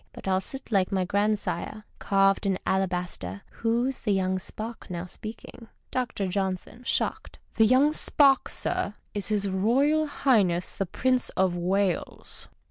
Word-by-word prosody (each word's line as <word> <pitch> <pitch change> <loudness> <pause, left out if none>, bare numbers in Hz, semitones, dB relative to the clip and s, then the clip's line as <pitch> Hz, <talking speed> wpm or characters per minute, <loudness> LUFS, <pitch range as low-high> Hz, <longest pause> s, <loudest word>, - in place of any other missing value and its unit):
But - - -9
I'll 190 0 +2
sit 265 +5 -3
like 195 -3 +2
my 190 -2 +1
grandsire, 210 +2 -1 0.2
carved 195 0 +2
in 190 -1 +1
alabaster. 180 - -2
Who's 240 +3 0
the 210 - -1
young 190 -1 +1
spark, 220 +5 -7
now 175 -1 -4
speak 215 +4 -8
ing? 230 - -12 0.2
Dr. 235 -6 -1
J. 190 0 0 0.3
{shocked). - - -1
— - - -36
The 225 -2 +6
young 270 +5 +4
spark, 275 -3 +3
sir, 205 - -1 0.2
is 205 -2 0
His 205 -2 +1
Royal 265 +11 +2
Highness 205 -12 +2
tiie 195 -3 -2
Prince 255 -1 +2
of 185 -2 +2
Wales. 185 +1 -1
200 Hz, 150 wpm, -27 LUFS, 190-235 Hz, 0.3 s, The